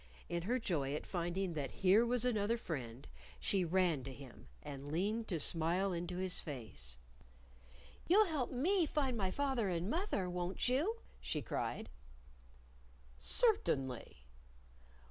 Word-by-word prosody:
In 170 0 -1
her 235 +9 +1
joy 150 - -1
at - - -4
finding 175 +1 -1
that 145 -4 -2
here 195 +4 +4
was 245 0 +1
another 225 -1 +2
friend, 130 - -5 0.3
she 195 -2 +2
ran 175 -5 +2
to 135 - -5
him 130 -1 -12 0.2
and 145 -1 -7
leaned 210 +7 0
to 170 -5 -1
smile 170 +5 +3
into 175 +1 -3
his 185 -1 0
face. 110 - -6 1.1
"You'll 415 +5 +7
help 300 -9 -1
me 335 +7 +2
to - - -12
find 270 -4 +1
my 195 -4 0
fath 270 +4 0
er 210 -4 +1
and 175 +3 -1
moth 370 +6 -1
er, 185 -2 0
won't 180 +4 -1
you?" 295 - +2 0.2
she 150 -3 -2
cried. - - -2 1.3
"Cer 460 -4 +4
tainly!" 130 - -3
185 Hz, 150 wpm, -37 LUFS, 155-240 Hz, 1.3 s, You'll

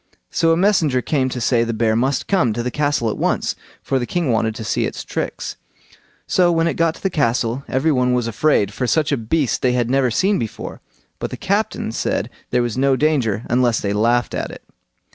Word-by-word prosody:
So 165 -1 +2
a 165 - +3
messenger 165 - +2
came 135 -4 0
to 125 - -4
say 120 0 +2
the 115 0 -2
bear 110 -1 +2
must 130 +3 0
come 155 - +2
to 120 +2 -3
the 125 - -2
castle 145 -6 0
at - - -6
once, - - 0 0.3
for 135 - 0
the 120 - -3
king 170 -7 0
wanted 110 -1 0
to 110 - -6
see - - 0
its - - -6
tricks. - - -4 0.7
So 180 -1 +3
when 165 -1 +2
it - - 0
got 165 -1 +1
to - - -16
the 195 - 0
castle 120 -3 0
every 135 +5 +1
one 125 -2 +2
was 125 -2 +1
afraid, 110 -3 +1
for 125 +3 -2
such 155 +3 +1
a - - +3
beast 130 +3 0
they 125 -1 +2
had 120 -1 0
never 135 -1 +3
seen 195 - +1
before; 115 -3 -6 0.4
but - - -3
the - - -6
captain - - -1
said - - -2 0.2
there 125 - +2
was 120 +1 -2
no 135 0 +3
danger 125 -7 +1
unless 120 -2 +2
they 100 0 -1
laughed 120 +3 +1
at - - -3
it. - - -11
125 Hz, 220 wpm, -20 LUFS, 115-150 Hz, 0.7 s, a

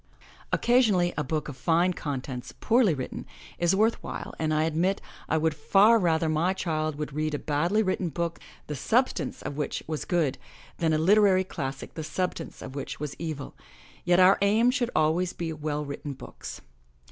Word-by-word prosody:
Occasionally, 215 -8 +3
a 150 - -1
book 155 +2 -2
of 145 - -6
fine 170 +5 +2
contents, 130 -5 -5
poorly 225 -8 +3
written, 130 -2 -6 0.3
is 175 +2 +3
worth 220 +3 +2
while, - - -6
and 155 -1 0
I 155 0 +2
admit 170 +5 +1 0.3
I 160 - +2
would 160 0 +1
far 205 +9 +5
rather 165 -3 +2
my 160 +4 +1
child 155 -4 -2
would 150 -1 -5
read 155 0 -1
a - - -1
badly 170 +10 +1
written 185 -2 -1
book 170 +2 -3 0.3
the 150 - -5
substance 170 - 0
of 145 - -5
which 150 - -2
was 155 -1 -4
good, 165 -7 0 0.4
than 165 -1 +2
a 155 - +3
literary 190 +2 +5
class 135 -7 -5
ic - - -11
the 160 - -5
substance 165 +1 -4
of - - -8
which 140 -1 -5
was 150 -1 -4
evil, 155 -4 -5 0.5
yet 175 0 +3
our 185 +1 +6
aim 220 +5 +4
should 250 -3 0
always 165 +4 +2
be 165 -2 -4
well 150 -1 -3
written 140 0 -5
books. - - -9
160 Hz, 180 wpm, -27 LUFS, 150-185 Hz, 0.5 s, our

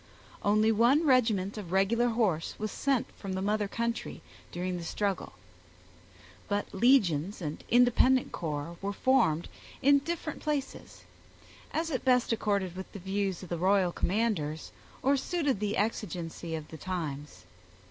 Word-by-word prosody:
Only 215 +2 +3
one 240 +9 +4
regiment 220 -7 +2
of 180 -5 -8
regular 210 +6 +3
horse 210 -9 0
was 215 -1 -3
sent 270 -4 0
from 195 -2 -5
the 190 - -2
mother 210 0 +1
country, 235 +3 -3 0.3
during 180 +1 -3
the 170 - -6
struggle. 195 - -2 1.1
But 205 0 -2
legions 195 - +3
and 155 -4 -5
independent 245 +1 +4
corps 160 0 -4
were 200 +1 -2
formed 215 -10 +2 0.3
in 280 +1 +5
different 320 +1 -4
places, 295 -3 -4 0.7
as 325 +1 -1
it 260 - -2
best 250 -2 +3
accorded 200 -5 0
with 190 0 -7
the - - -6
views 195 0 -2
of 180 - -9
the 170 - -3
royal 190 0 +3
commanders, 180 -7 -1 0.3
or 275 +2 +4
suited 290 - -1
the 210 0 -1
exigency 175 -6 -3
of 155 -1 -7
the 160 - -9
times. 150 - -5
205 Hz, 145 wpm, -30 LUFS, 175-245 Hz, 1.1 s, in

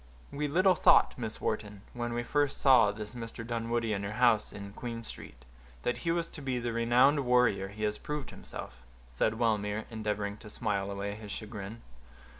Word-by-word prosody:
"We 150 +1 -1
little 185 +6 +4
thought, - - +5
Miss 110 -3 -4
Wharton, 105 -2 -3
when 120 -1 -3
I 120 - -1
first 145 +2 0
saw 125 -7 +6
this 105 0 -7
Mr. 115 -1 -7
Dunwoodie 115 -1 -1
in 100 - -2
your 100 +1 -4
house 115 -2 +3
in 100 0 -8
Queen 115 -1 -5
Street, 60 - -11 0.4
that 120 - 0
he 170 - -2
was 170 0 0
to 150 - -8
be 130 -2 -1
the 120 -1 -2
renowned 125 +5 +4
warrior 125 -7 +3
he 105 +2 -7
has 105 0 0
proved 150 -5 -4
himself," - - -9 0.3
said 110 - 0
Wellmere, 110 -2 0
endeavoring 105 -2 -2
to 105 - -11
smile 100 -3 -1
away 100 0 -3
his 105 -1 -8
chagrin. 110 +1 -6
115 Hz, 185 wpm, -31 LUFS, 105-125 Hz, 0.4 s, saw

